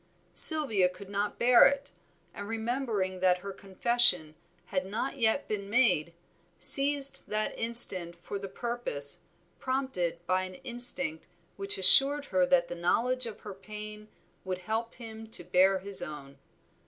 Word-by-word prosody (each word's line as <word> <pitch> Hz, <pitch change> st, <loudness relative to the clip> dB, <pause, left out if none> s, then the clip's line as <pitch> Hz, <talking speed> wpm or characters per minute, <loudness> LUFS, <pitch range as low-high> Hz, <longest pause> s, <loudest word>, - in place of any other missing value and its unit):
Sylvia 240 Hz, -, +6 dB
could 195 Hz, +2 st, -14 dB
not 205 Hz, +1 st, -4 dB
bear 245 Hz, 0 st, +5 dB
it, 280 Hz, 0 st, -4 dB, 0.4 s
and 200 Hz, -, -9 dB
remembering 225 Hz, -4 st, -4 dB
that 180 Hz, -1 st, +1 dB
her 200 Hz, -, -6 dB
confession 190 Hz, -4 st, -1 dB, 0.3 s
had 185 Hz, -1 st, -4 dB
not 220 Hz, +8 st, -6 dB
yet 225 Hz, +4 st, 0 dB
been 200 Hz, -2 st, -6 dB
made, 215 Hz, -9 st, 0 dB, 0.5 s
seized 275 Hz, 0 st, +3 dB
that 215 Hz, 0 st, -2 dB
instant 190 Hz, -7 st, +4 dB
for 175 Hz, +4 st, -8 dB
the 195 Hz, -, -8 dB
purpose, 185 Hz, -, 0 dB, 0.4 s
prompted 255 Hz, -11 st, -4 dB
by 185 Hz, +1 st, -1 dB
an 185 Hz, 0 st, -11 dB
instinct 255 Hz, +6 st, -2 dB, 0.3 s
which 400 Hz, +1 st, +1 dB
assured 285 Hz, -3 st, +5 dB
her 185 Hz, -1 st, +1 dB
that 175 Hz, -1 st, +1 dB
the -, -, -7 dB
knowledge 235 Hz, +9 st, -2 dB
of 220 Hz, -, -11 dB
her 205 Hz, -, -10 dB
pain 210 Hz, +2 st, -11 dB, 0.4 s
would 185 Hz, -1 st, -5 dB
help 225 Hz, +1 st, -4 dB
him 225 Hz, -2 st, -11 dB
to 220 Hz, -, -2 dB
bear 185 Hz, +2 st, +2 dB
his 195 Hz, +1 st, +1 dB
own. 150 Hz, -5 st, -10 dB
210 Hz, 145 wpm, -28 LUFS, 185-245 Hz, 0.5 s, Sylvia